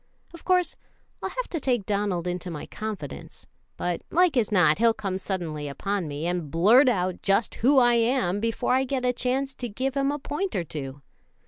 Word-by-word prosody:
Of 335 - -12
course 365 -1 +2 0.5
I'll - - -2
have - - -4
to 330 - -2
take 245 -7 0
Donald 200 -4 -1
into 180 0 -3
my 155 -3 -6
confidence; 210 -9 -7 0.3
but 175 -1 -2
like 355 -3 +3
as 230 -4 +1
not 175 -4 +4
he'll 230 -1 +4
come 190 -2 -3
suddenly 165 -6 -4
upon 195 +5 -2
me, 145 +2 -4
and 175 -3 -2
blurt 220 - +5
out 185 -5 -1
just 200 +3 +1
who 270 +5 +4
I 240 -2 +6
am 230 -5 +1
before 230 +3 0
I 260 +1 +3
get 260 -1 -2
a 250 - +2
chance 265 +2 -1
to 245 -3 -5
give 260 +5 -2
him 275 0 +1
a 290 - -2
point 330 +7 -3
or 175 - 0
two. 140 -3 -7
215 Hz, 200 wpm, -26 LUFS, 180-260 Hz, 0.5 s, I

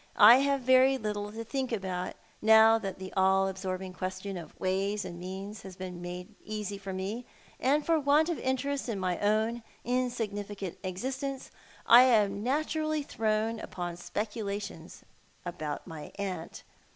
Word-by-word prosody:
I 225 +4 +10
have 275 0 +2
very 260 +1 +5
little 210 -3 -3
to 225 +1 -6
think 260 +2 -3
about, 185 -4 -3 0.3
now 220 +1 +7
that 195 -4 -5
the 190 0 -8
all 190 0 +4
absorbing 190 -1 -4
questiou 185 0 -4
of 160 - -15
ways 195 +2 0
and 175 -2 -7
means 195 +4 -6
has 190 -2 -10
been 185 -1 -7
made 180 +4 -7
easy 210 -2 -4
for 195 -1 -6
me; 195 +6 -3 0.4
and 290 +3 +2
for 330 -1 +3
want 295 +2 +4
of 340 -3 -2
interest 265 +1 -1
in 210 -4 -2
my 180 -2 -1
own 220 +3 +1 0.2
insignificant 210 -6 -2
existence 265 +8 -4 0.3
I 240 +1 +9
am 205 -5 +3
naturally 310 +4 0
thrown 220 -2 0
upon 175 -1 -5
speculations 205 -2 -5 0.4
about 155 -4 -4
my 160 -4 -8
aunt. 200 -2 -5
205 Hz, 150 wpm, -30 LUFS, 190-245 Hz, 0.4 s, I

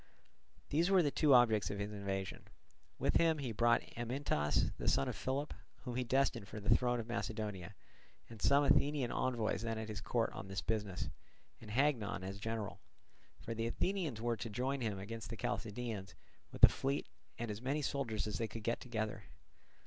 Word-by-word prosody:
These 165 +5 +2
were 190 -3 +6
the 145 - +2
two 150 0 +3
objects 110 -7 +5
of 100 - -3
his 100 +1 -3
invasion. 95 -2 -4 0.5
With - - +3
him 165 -1 +4
he 135 -5 -3
brought 120 +2 +3
Amyntas, 120 - 0
the - - -3
son 70 - +3
of - - -2
Philip, 140 +3 -2 0.3
whom 125 -3 -4
he 125 - +1
destined 125 -4 +1
for 110 - -7
the 105 +2 +4
throne 125 0 +1
of 115 - -3
Macedonia, 105 -6 -3 0.5
and 115 -3 -11
some 140 +1 +5
Athenian 140 -2 +3
envoys 120 -5 0
then 115 -1 -2
at 110 0 -4
his 105 -2 -4
court - - 0
on - - -7
this 95 0 -3
business, 105 -4 -2 0.5
and 110 - -10
Hagnon 115 -5 +1
as 95 +1 -5
general; 110 -1 -3 0.6
for 115 - -4
the 115 0 -1
Athenians 160 - -1
were 120 0 0
to 115 +2 -4
join 130 +5 -1
him 110 -4 -1
against 110 +3 -6
the 115 - -5
Chalcidians 110 -4 -3 0.4
with - - -10
a - - +15
fleet 140 +2 -1 0.3
and 120 -2 -3
as 105 +2 -6
many 140 +4 -1
soldiers 120 -7 -1
as 105 - -3
they 115 - 0
could 110 0 -8
get 115 +2 0
together. 110 -3 -3
115 Hz, 185 wpm, -36 LUFS, 105-130 Hz, 0.6 s, a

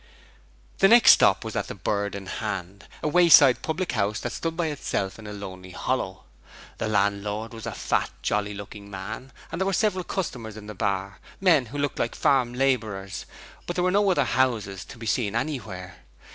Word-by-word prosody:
The 195 - +7
next 235 +3 +8
stop - - +4
was - - -5
at - - -1
the - - -6
Bird 100 -1 -2
in 100 -1 -6
Hand, 100 -2 -5 0.2
a - - +1
wayside 150 -5 +7
public 170 +3 -2
house 105 -2 0
that - - -3
stood - - -3
all - - -15
by 175 - +1
itself 115 -9 -3
in 105 - -9
a - - -6
lonely 95 -2 -8
hollow. 95 -2 -3 0.6
The - - -1
landlord 105 +2 0
was 115 -1 -7
a - - -2
fat, - - 0
jolly 105 0 0
looking 100 0 -9
man, 100 +7 -7 0.2
and 165 +3 -4
there 190 - +1
were 195 - 0
several 190 -2 +1
customers 120 - -4
in 105 - -9
the 105 - -7
bar 100 0 -2 0.2
men 165 -10 +4
who 140 +6 -7
looked 145 -1 -2
like 115 - -1
farm 125 -3 +2
labourers, 110 -8 -1 0.4
but 175 - -3
there 180 - +1
were 185 - +2
no 200 +1 +3
other 145 -7 +3
houses 115 -7 0
to - - -11
be 115 - -8
seen 110 -2 0
anywhere. 105 - -4
110 Hz, 200 wpm, -25 LUFS, 100-145 Hz, 0.6 s, next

